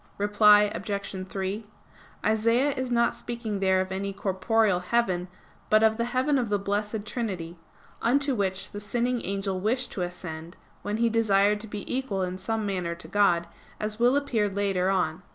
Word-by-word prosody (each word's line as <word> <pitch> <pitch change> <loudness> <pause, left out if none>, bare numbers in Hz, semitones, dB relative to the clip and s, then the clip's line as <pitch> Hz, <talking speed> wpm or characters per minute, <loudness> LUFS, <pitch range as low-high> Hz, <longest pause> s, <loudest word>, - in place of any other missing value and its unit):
Reply 210 0 +6
Obj. 200 -2 -4
3: 195 +3 -3 0.6
Isaias 230 +6 +3
is 260 -1 -3
not 235 -1 +2
speaking 230 -4 -4
there 190 -1 +3
of 190 0 -4
any 195 +1 -3
corporeal 200 +1 +1
heaven, 180 -2 0 0.4
but 215 +1 +5
of 220 0 +4
the 235 - 0
heaven 260 +3 +1
of 240 -4 -2
the 205 - +2
Blessed 205 +2 -2
Trinity; 190 -7 -4 0.5
unto 275 +3 +2
which 195 -4 -1
the 205 - -6
sinning 240 +3 -1
angel 195 -1 -2
wished 245 +5 0
to 190 - -4
ascend, 175 -2 -6 0.2
when 210 +1 -2
he 235 +1 +3
desired 210 -2 +3
to 220 - -8
be 205 -1 -6
equal 250 -8 -1
in 185 0 -4
some 220 +3 -2
manner 180 -4 -2
to 165 - -10
God, 175 -2 +3 0.3
as 215 +1 -3
will 245 +3 +4
appear 240 -8 +1
later 195 -2 0
on 180 -5 +1
(Q. - - -20
205 Hz, 175 wpm, -27 LUFS, 190-230 Hz, 0.6 s, Reply